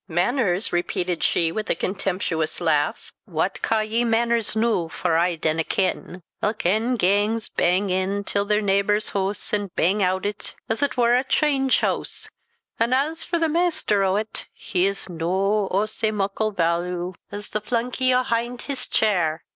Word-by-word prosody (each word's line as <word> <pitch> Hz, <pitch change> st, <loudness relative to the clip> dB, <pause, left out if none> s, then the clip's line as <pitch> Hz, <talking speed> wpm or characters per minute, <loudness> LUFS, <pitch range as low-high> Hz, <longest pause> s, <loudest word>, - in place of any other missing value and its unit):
"Mainers!" 185 Hz, -, +1 dB
repeated 175 Hz, 0 st, -1 dB
she, 165 Hz, -1 st, +2 dB
with 215 Hz, +3 st, -4 dB
a -, -, +2 dB
contemptuous 185 Hz, -3 st, -2 dB
laugh, -, -, 0 dB
"what -, -, -2 dB
caw 225 Hz, -1 st, +1 dB
ye 220 Hz, +2 st, 0 dB
mainers 230 Hz, -1 st, +1 dB
noo, 220 Hz, -7 st, +1 dB
for 165 Hz, 0 st, -1 dB
I 170 Hz, +1 st, +2 dB
dinna 160 Hz, 0 st, 0 dB
ken? 185 Hz, 0 st, -2 dB, 0.2 s
Ilk 210 Hz, -2 st, -1 dB
ane 220 Hz, +7 st, +2 dB
gangs 210 Hz, +2 st, +1 dB
bang 185 Hz, +2 st, +1 dB
in 190 Hz, +2 st, 0 dB
till 200 Hz, 0 st, 0 dB
their 210 Hz, +1 st, +1 dB
neebor's 200 Hz, +1 st, +1 dB
hoose, 200 Hz, +2 st, -2 dB
and 205 Hz, -1 st, 0 dB
bang 195 Hz, +5 st, +2 dB
oot 185 Hz, 0 st, +1 dB
o't 205 Hz, 0 st, -4 dB
as 225 Hz, +4 st, -1 dB
it 285 Hz, -3 st, 0 dB
war 240 Hz, -1 st, +4 dB
a 250 Hz, +1 st, +3 dB
chynge 270 Hz, -1 st, +2 dB
hoose; -, -, -2 dB, 0.5 s
an' 230 Hz, +2 st, +2 dB
as 305 Hz, +5 st, 0 dB
for 345 Hz, -, -1 dB
the 330 Hz, -1 st, +2 dB
maister 315 Hz, -, +1 dB
o't, 200 Hz, +3 st, -1 dB
he's 195 Hz, +1 st, -1 dB
no 190 Hz, +4 st, 0 dB
o' 200 Hz, +3 st, +1 dB
sae 215 Hz, 0 st, -1 dB
muckle 210 Hz, +1 st, -1 dB
vaalu 175 Hz, 0 st, -1 dB, 0.2 s
as 205 Hz, +1 st, -7 dB
tho 215 Hz, -, -1 dB
flunky 245 Hz, +4 st, 0 dB
ahynt 245 Hz, -1 st, 0 dB
his 265 Hz, -3 st, -4 dB
chyre. 175 Hz, -7 st, +1 dB
205 Hz, 165 wpm, -23 LUFS, 185-230 Hz, 0.5 s, war